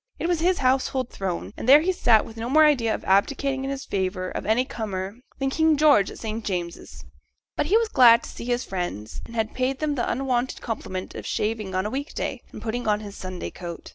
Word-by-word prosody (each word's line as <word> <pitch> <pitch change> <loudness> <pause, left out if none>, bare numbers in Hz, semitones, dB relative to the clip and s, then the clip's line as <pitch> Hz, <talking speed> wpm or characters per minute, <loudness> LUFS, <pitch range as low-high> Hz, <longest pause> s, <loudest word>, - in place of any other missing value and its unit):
It - - -2
was 350 -2 +1
his 355 +2 +2
household 260 -1 +1
throne, 190 0 -4
and 245 - -3
there 290 +3 +9
he 365 +4 +1
sat 235 - +4
with 225 - -11
no 230 +1 -4
more 310 +3 +6
idea 245 -7 +3
of - - -8
abdicating 265 +7 +1
in 275 0 -2
favour 185 -6 -3
of - - -5
any 230 +4 +3
comer 200 -3 -5 0.2
than 270 -1 -1
King 320 +1 +3
George 285 -9 +5
at - - -10
St 220 0 -4
James's. 170 - -5 0.5
But - - 0
he 405 +7 +5
was 460 0 +1
glad 240 - +6
to - - -8
see - - -8
his 245 0 -1
friends; 175 - -5
and 230 - -11
had 220 -1 -1
paid 260 +1 -1
them 305 0 -1
the 250 -4 -1
unwonted 255 0 -1
compliment 190 -5 -5
of - - -7
shaving 210 -3 -2
on 185 +1 0
a 210 - -2
week 280 +3 -4
day, - - -3
and - - -10
putting 235 +1 -3
on 210 0 +2
his 205 -1 -9
Sunday 185 -1 -6
coat. 175 -2 -8
235 Hz, 230 wpm, -25 LUFS, 200-270 Hz, 0.5 s, there